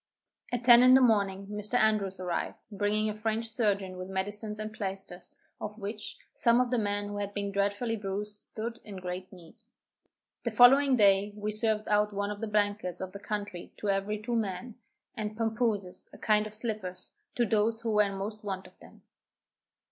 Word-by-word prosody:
At 245 0 -2
ten 240 0 +9
in 255 +1 +8
the - - +8
morning, 200 -5 +2
Mr. 210 +3 -3
Andrews 210 -5 +2
arrived, 180 -2 -2
bringing 210 +1 0
a 215 - -1
French 220 +2 -2
surgeon 200 -5 0
with 185 +1 -6
medicines 205 +3 -2
and 215 0 -5
plaisters, 190 -3 -5 0.2
of 210 - -6
which, 210 0 -6 0.2
some 235 0 +3
of 250 -1 +1
the 245 - +2
men 205 -1 -1
who 205 - -5
had 205 0 -4
been 200 -1 -2
dreadfully 205 +4 0
bruised, 205 0 -5
stood 230 +2 -6
in 205 - -9
great 185 0 -6
need. 175 -4 -14 0.9
The - - 0
following 270 +2 +7
day, 200 -2 +4
we 210 0 -3
served 215 0 +1
out 210 0 +2
one 200 +1 -1
of 205 +1 -7
the 225 - -2
blankets 205 -3 0
of 190 0 -5
the 200 - -8
country 205 -4 -5
to 210 - -3
every 195 +2 -1
two 235 +3 -3
men, 215 +1 -2 0.4
and 215 -1 -5
pampooses, 220 -4 -1
a - - -13
kind 215 0 +2
of 215 - -10
slippers, 215 -5 -5 0.2
to 240 - +2
those 225 +1 +1
who 230 -1 -1
were 210 0 +5
in 200 -1 0
most 210 +2 -5
want 190 -2 -4
of - - -17
them. - - -16
210 Hz, 190 wpm, -30 LUFS, 200-220 Hz, 0.9 s, ten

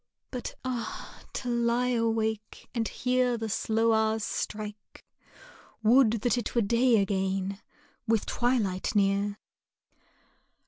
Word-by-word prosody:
But 250 -2 -5
ah! 240 -3 -5
to 250 - -4
lie 240 +1 +1
awake 225 -2 -1
and 230 -3 0
hear 250 -1 +1
the 225 -1 -3
slow 225 +2 +1
hours 220 0 +1
strike! 210 -1 -5 0.8
Would 230 -1 +5
that 245 0 +2
it 235 - -5
were 235 - +3
day 235 +3 +3
again! 195 0 -1 0.5
with 225 -2 +2
twilight 225 -7 0
near! 200 0 +2
225 Hz, 110 wpm, -28 LUFS, 205-240 Hz, 0.8 s, Would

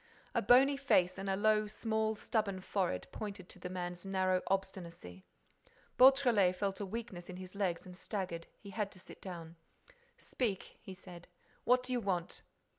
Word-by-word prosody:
A - - +2
bony 260 +6 +6
face 185 -9 +3
and 195 0 -3
a 190 - +2
low, 215 +1 +3
small 220 0 -1
stubborn 205 -3 -1
forehead 185 - -1
pointed 200 -4 -6
to - - -9
the 180 - -5
man's 180 -1 -4
narrow 185 -1 +1
obstinacy. 175 - -4 0.7
Beautrelet 250 -8 +6
felt 195 +1 -2
a 200 - -3
weakness 200 -4 -6
in 180 - -6
the 185 0 -7
legs 190 -4 -1
and 180 -1 -10
staggered. 180 -4 -4
He 200 - -11
had 205 0 -2
to 185 - -12
sit - - -12
down: 170 -3 -8 0.6
"Speak," 210 -7 -3
he 190 - -9
said. 180 -2 -12 0.4
"What 250 +1 +4
do 255 0 -3
you 245 - +2
want?" 185 -5 -2
195 Hz, 170 wpm, -34 LUFS, 180-215 Hz, 0.7 s, bony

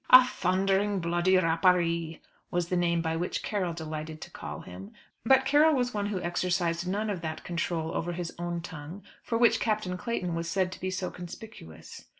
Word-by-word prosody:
"A 255 0 +10
thundering 195 0 +1
bloody 175 +2 +2
rapparee" 170 -1 +2 0.3
was 175 -1 -1
the 180 - +1
name 170 -1 +2
by 160 -1 -1
which 175 +2 -2
Carroll 185 -5 -1
delighted 155 -1 -6
to - - -8
call - - -7
him. 95 +3 -10 0.3
But 265 +3 +5
Carroll 300 +2 +5
was 245 -1 0
one 205 -1 -1
who 205 -2 -2
exercised 175 0 0
none 210 +3 -1
of 185 -4 -4
that 160 -1 -5
control 170 -2 -2
over 175 +1 -2
his 175 -1 -4
own 175 0 -2
tongue 165 +4 -8 0.2
for 230 - -1
which 230 -1 +4
Captain 210 -5 -1
Clayton 180 -4 -2
was 165 0 -2
said 185 0 +1
to - - -8
be 185 - -1
so 185 0 -3
conspicuous. 175 - -10
175 Hz, 185 wpm, -29 LUFS, 170-195 Hz, 0.3 s, A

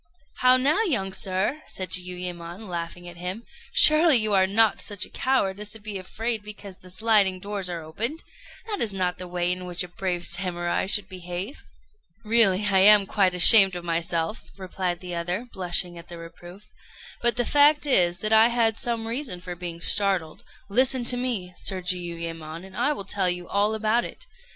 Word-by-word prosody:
"How 255 0 +4
now, 290 +11 +2
young 220 - -1
sir!" 190 +10 -2
said 185 -2 -6
Jiuyémon, 180 +1 -4
laughing 175 0 -6
at 175 0 -11
him, 180 +6 -6 0.3
"surely 315 - +5
you 215 -2 -1
are 190 -1 +3
not 215 +2 +2
such 205 -2 -2
a - - -18
coward 205 -7 -1
as 210 0 -4
to 220 - -10
be 205 -2 -6
afraid 225 +4 -2
because 205 -2 -11
the 185 - -16
sliding 195 -1 +2
doors 200 -1 -4
are 170 -2 -6
opened? 230 - -5 0.4
That 420 -3 -5
is 215 -4 +1
not 180 -2 -2
the 180 - -7
way 175 0 -1
in 180 0 -5
which 175 0 -2
a - - -8
brave 175 -1 -4
Samurai 175 -1 -2
should 200 -1 +2
behave." 180 - -7 0.6
"Really 210 -3 +3
I 195 -2 +3
am 205 +1 +7
quite 190 -2 +1
ashamed 195 +1 +8
of 175 - -6
myself," 170 +3 -3
replied 185 -2 -4
the 180 -1 -7
other, 175 +7 -3
blushing 175 -1 0
at 170 - -13
the 170 - -10
reproof; 175 +3 -13 0.6
"but 240 -2 +3
the 245 0 0
fact 295 +2 +4
is 175 -10 +2
that 215 +1 0
I 220 +1 +7
had 230 -2 0
some 230 -2 -2
reason 235 -5 -2
for 180 0 -7
being 175 -1 -7
startled. 185 -4 -1 0.2
Listen 255 +4 +2
to 245 - +4
me, 235 -8 -3
Sir 190 -2 -2
Jiuyémon, 170 -2 -5
and 190 - -14
I 295 - 0
will 200 -10 -5
tell 195 -2 0
you 175 -1 -4
all 205 +2 0
about 220 +2 0
it. - - -10
190 Hz, 190 wpm, -24 LUFS, 175-225 Hz, 0.6 s, ashamed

